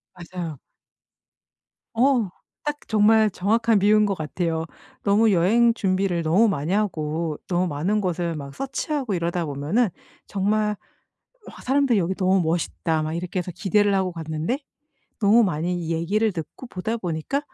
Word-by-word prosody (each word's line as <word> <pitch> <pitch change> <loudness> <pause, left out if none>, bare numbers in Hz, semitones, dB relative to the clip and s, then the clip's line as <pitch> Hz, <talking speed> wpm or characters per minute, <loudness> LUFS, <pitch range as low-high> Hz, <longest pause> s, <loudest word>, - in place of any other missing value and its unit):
맞아요. 175 -3 -6 1.4
어 245 -3 +3 0.4
딱 295 0 -4
정말 220 0 +4
정확한 220 +4 +2
비유인 210 +2 +4
것 200 - -1
같아요. 160 +1 -2 0.4
너무 210 +2 +4
여행 215 +7 +4
준비를 185 -4 0
너무 185 +9 +4
많이 175 -2 -1
하고 160 -6 -1
너무 180 0 +1
많은 175 +8 0
곳을 175 -3 -1
막 140 -2 -8
서치하고 275 -3 -2
이러다 170 -1 -1
보면은 155 - 0 0.4
정말 210 +2 0 0.7
"우와." - - -11
사람들이 265 -4 +2
"여기 180 +1 0
너무 190 0 +2
멋있다." 165 -1 -1
막 155 0 -3
이렇게 180 +2 -3
해서 180 0 -4
기대를 205 +2 +2
하고 190 -1 0
갔는데 160 - -3 0.6
너무 220 +2 +5
많이 175 -1 -1
얘기를 195 +7 +1
듣고 170 - -7
보다 220 +1 -3
보니까 180 - -2
185 Hz, 310 characters per minute, -24 LUFS, 165-215 Hz, 1.4 s, 너무